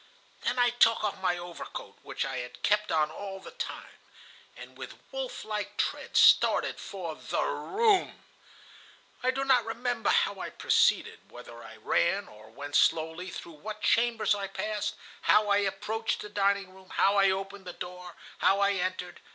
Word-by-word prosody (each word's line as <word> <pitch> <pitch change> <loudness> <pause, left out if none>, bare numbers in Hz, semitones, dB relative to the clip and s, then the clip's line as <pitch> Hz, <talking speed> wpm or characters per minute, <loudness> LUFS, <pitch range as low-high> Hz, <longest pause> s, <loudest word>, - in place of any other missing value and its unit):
"Then 255 - -1
I 245 -1 +4
took 230 -2 +4
off 205 -2 -2
my 180 -2 +1
overcoat, 175 -1 -8
which - - -3
I 135 -1 -4
had 125 0 -7
kept 210 +1 +2
on 155 -1 +2
all 195 +3 -7
the 190 - -11
time, 480 0 -7 0.6
and - - -11
with - - -8 0.2
wolf - - -5
like 210 -1 -4
tread - - -1
started - - +5
for 180 -5 -6
the - - -2
room. 415 -2 +1 1.0
I 255 - +1
do 270 +1 0
not 260 -3 +4
remember 240 +2 -2
how - - +2
I - - -4
proceeded, - - +1
whether - - -11
I - - -11
ran 195 +3 +1
or 105 +1 -15
went 145 +5 -7
slowly, 160 +3 +2
through 165 -3 -9
what 215 0 -7
chambers 230 -3 +3
I 200 -1 -3
passed, 215 +1 -3 0.3
how 210 0 +4
I 200 - +4
approached 205 +3 -1
the 210 - -7
dining 200 -2 0
room, 190 0 -17
how 200 +1 +4
I 195 0 +5
opened 195 0 -4
the 180 - -6
door, 180 -1 -8 0.2
how 195 - +4
I 200 0 +4
entered. 185 -2 -3
200 Hz, 170 wpm, -29 LUFS, 180-220 Hz, 1.0 s, started